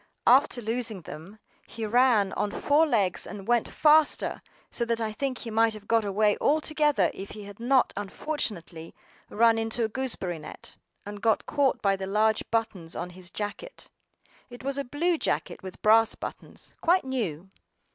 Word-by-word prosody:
AFTER 250 -1 +4
losing 225 -3 -2
them, 165 +7 -10 0.3
he 225 -1 -5
ran 225 -3 +3
on 205 - -1
four 295 +9 +2
legs 205 -9 0
and 200 -1 -8
went 240 -1 +2
faster, 305 0 +3 0.3
so 235 - -2
that 230 -1 0
I 220 -1 -2
think 265 +2 -2
he 230 - -7
might 225 0 +3
have 205 -1 -12
got 230 -1 +3
away 205 +1 +2
altogether 300 - +2
if 195 - -8
he 210 - -9
had 205 +1 -11
not 255 +2 +2
unfortunately 195 - -5 0.3
run 225 +1 +3
into 225 +1 -1
a - - +2
gooseberry 210 -9 -3
net, 150 - -9 0.3
and 205 0 -8
got 225 -1 +2
caught 285 -3 +1
by 195 -1 +3
the 190 0 -5
large 215 +2 +2
buttons 215 -7 -2
on 180 - -5
his 180 0 -11
jacket. 210 - -7 0.6
It 245 0 -11
was 275 +1 -1
a - - -1
blue 315 +6 0
jacket - - -2
with 185 -1 -9
brass 225 +1 +5
buttons, - - -9
quite 350 -2 +3
new. 195 - -3
225 Hz, 170 wpm, -27 LUFS, 200-260 Hz, 0.6 s, brass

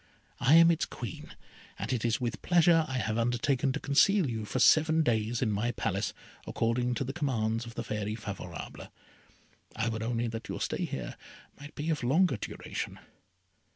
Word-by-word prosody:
I 135 +6 +5
am 165 0 +8
its 165 - 0
Queen, 115 -8 -8 0.4
and - - -3
it 120 - -1
is 115 -1 +1
with 120 -2 -3
pleasure 170 -2 +4
I 130 - -3
have 110 -2 -1
undertaken 120 +3 +1
to 150 - -2
conceal 165 +6 +3
you 110 -3 -3
for 115 - -3
seven 160 +4 +5
days 115 -2 0
in 110 - +1
my 110 +4 -1
Palace, - - -1 0.4
according 120 +2 0
to 125 - -1
the 135 +1 -4
commands 115 -7 -1
of 115 - -10
the 120 - -3
Fairy 105 -1 -3
Favourable. 100 -6 -7 0.9
I 115 +1 0
would 110 -1 -3
only 115 +1 -1
that 115 0 -7
your - - -4
stay - - -1
here 65 -3 -5 0.4
might 145 +1 -11
be 155 +2 -2
of 155 - -1
longer 150 +2 +3
duration." - - -5
120 Hz, 180 wpm, -30 LUFS, 110-145 Hz, 0.9 s, am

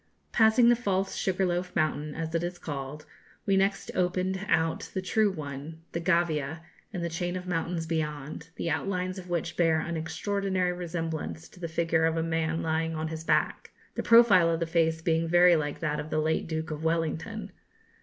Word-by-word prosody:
Passing 230 +1 +5
the 240 - +6
false 195 -5 -1
Sugarloaf 180 -1 -1
mountain, 150 -2 0
as 160 0 -4
it 165 0 0
is 175 0 -3
called, 145 -1 -6 0.4
we 195 - +3
next 195 +1 +1
opened 185 +1 0
out 160 0 +1
the - - +1
true 215 +3 +3
one, 155 0 -7
the 170 - -2
Gavia, 165 -3 +1 0.3
and 180 -5 -4
the - - 0
chain 175 +2 -2
of 180 0 -5
mountains 170 -1 -2
beyond, 150 -1 -3
the - - -3
outlines 185 -1 -2
of 180 -1 -11
which 170 -1 -2
bear 165 -2 +3
an 170 +1 -3
extraordinary 185 +3 -1
resemblance 165 -2 -4
to - - -17
the 170 - -3
figure 165 0 +1
of 165 0 +1
a 165 - +1
man 160 0 -1
lying 160 0 0
on 160 0 -2
his 160 0 -5
back, - - +1 0.2
the - - -2
profile 220 -7 +6
of 165 -1 0
the 170 - 0
face 160 -1 +1
being 165 0 +1
very 175 +1 +6
like 145 -2 -2
that 150 -2 -1
of 150 +1 -5
the 155 - -1
late 155 +1 0
Duke 160 0 -3
of 155 +1 -5
Wellington. 165 +6 -2
165 Hz, 190 wpm, -28 LUFS, 160-180 Hz, 0.4 s, the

